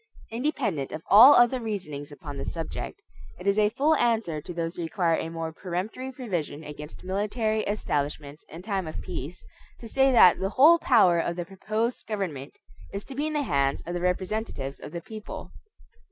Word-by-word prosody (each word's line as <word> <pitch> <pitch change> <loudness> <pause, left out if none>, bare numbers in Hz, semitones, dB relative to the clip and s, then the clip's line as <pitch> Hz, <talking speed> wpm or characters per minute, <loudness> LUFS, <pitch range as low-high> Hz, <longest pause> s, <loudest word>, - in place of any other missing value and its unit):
Independent 230 - -1
of 155 - -6
all 245 +8 +10
other 245 +1 +5
reasonings 165 -10 -5
upon 145 -1 -8
the - - -4
subject, 165 -1 -5 0.4
it - - -10
is 200 +1 +3
a 210 0 +4
full 280 +8 +2
answer 220 -10 +1
to 180 - -8
those 165 0 -3
who - - -5
require 170 0 0
a 160 - -3
more 165 -1 -5
peremptory 195 +10 -4
provision 175 - -4
against 150 +1 -9
military 215 +3 -1
establishments 150 -6 -3
in 165 +3 -10
time 195 -5 -2
of 155 - -5
peace, 175 -1 -7 0.3
to 230 - -10
say 270 +4 +3
that 185 -8 +7
the 190 - -1
whole 310 +10 +6
power 185 - +4
of 170 +1 -1
the 175 -1 -4
proposed 215 +5 -3
government 180 -11 -4 0.4
is 200 +1 -6
to 270 - -9
be 290 +3 -1
in 310 - -3
the 295 -1 0
hands 140 - 0
of 175 - -4
the 175 - -3
representatives 180 -6 -2
of - - -9
the 170 - -5
people. 215 +4 -9
185 Hz, 185 wpm, -26 LUFS, 160-225 Hz, 0.4 s, all